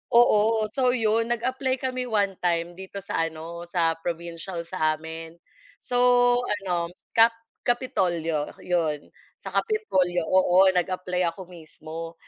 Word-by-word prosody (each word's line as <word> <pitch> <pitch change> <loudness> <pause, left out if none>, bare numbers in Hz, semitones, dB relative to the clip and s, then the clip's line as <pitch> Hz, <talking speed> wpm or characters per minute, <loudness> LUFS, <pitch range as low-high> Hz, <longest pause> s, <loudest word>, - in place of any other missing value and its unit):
oo. 220 -2 +4
So, 255 -1 +2
'yon 225 0 +1
nag-apply 260 +2 -1
kami 255 -1 -2
one-time 180 -5 0
dito 190 0 -7
sa 165 -4 -1
ano, 165 +2 -8
sa 165 -2 0
provincial 170 +1 -5
sa 155 -3 0
amin. 160 +1 -9 0.5
So, 245 - -1 0.4
ano 195 -7 -2 0.2
ka 225 0 +7 0.4
kapitolyo, 170 - 0
'yon. 160 -5 -1 0.3
Sa - - -6
kapitolyo. 190 - +1
Oo, 185 0 +5
nag-apply 180 0 -1
ako 185 +1 -11
mismo 165 -1 -9
180 Hz, 115 wpm, -25 LUFS, 165-225 Hz, 0.5 s, ka